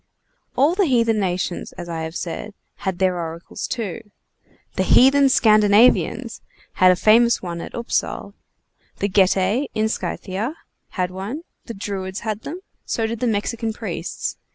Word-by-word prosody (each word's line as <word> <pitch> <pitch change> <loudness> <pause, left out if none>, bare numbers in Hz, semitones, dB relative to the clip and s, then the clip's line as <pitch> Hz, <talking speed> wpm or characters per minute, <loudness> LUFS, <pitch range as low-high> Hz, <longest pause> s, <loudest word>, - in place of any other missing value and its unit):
All 290 +5 +4
the 380 -1 +2
heathen 230 -4 +2
nations, 180 -2 -2
as 175 - -8
I 165 -1 -4
have 160 +1 -5
said, 190 +5 -5 0.2
had 190 -3 -3
their 185 -1 +1
oracles 165 0 -6
too. 225 -2 -5 0.6
The - - -1
heathen 275 +2 +5
Scandinavians 215 -1 +4 0.4
had 185 0 +8
a - - +3
famous 230 +4 +4
one 170 -2 -4
at - - -8
Upsal. 235 0 -2 0.6
The 200 - 0
Getae, 195 +6 +2
in 215 0 +2
Scythia, 215 +6 -3 0.4
had 180 -1 0
one. 205 - -5 0.2
The 230 - -6
Druids 195 -1 -5
had 215 -1 -3
them; 340 +10 -7 0.2
so 225 - -1
did 225 0 -3
the 250 - 0
Mexican 225 +1 -1
priests. 185 -6 -5
210 Hz, 150 wpm, -21 LUFS, 185-235 Hz, 0.6 s, had